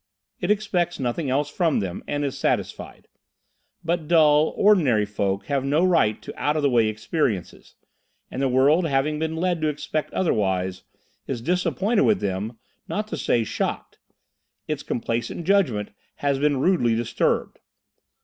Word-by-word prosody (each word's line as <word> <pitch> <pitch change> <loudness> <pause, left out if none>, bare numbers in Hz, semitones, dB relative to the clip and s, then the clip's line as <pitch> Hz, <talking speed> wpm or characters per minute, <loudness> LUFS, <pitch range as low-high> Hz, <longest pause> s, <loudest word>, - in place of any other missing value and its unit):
It - - -2
expects 195 -5 0
nothing 130 +3 -2
else 140 +3 +1
from 160 +1 +1
them, 95 -3 -4
and 145 0 -1
is 135 - -3
satisfied. - - -3 0.8
But 170 -2 -1
dull, 155 -2 +4
ordinary 150 - +4
folk 100 -1 -2
have 140 -2 -1
no 150 +6 +2
right 165 - +2
to - - -8
out 150 +1 +1
of 150 - -1
the 140 - +3
way 115 -3 +3
experiences, 110 - -3 0.6
and 130 - -4
the 135 - +2
world 145 +7 +3
having 150 +2 0
been 160 0 -2
led 175 0 -1
to 155 - +1
expect 150 +1 -3
otherwise, 95 - 0 0.5
is 130 -3 -3
disappointed 180 - 0
with 210 -3 +3
them, 100 +4 -3 0.3
not 210 +1 -3
to - - -3
say 115 - +1
shocked. - - -4 0.7
Its 150 -2 -2
complacent 120 +8 -3
judgment 145 - +1 0.2
has 140 -1 0
been 145 -1 +2
rudely 130 -6 +2
disturbed. 115 0 -1
145 Hz, 150 wpm, -24 LUFS, 115-170 Hz, 0.8 s, dull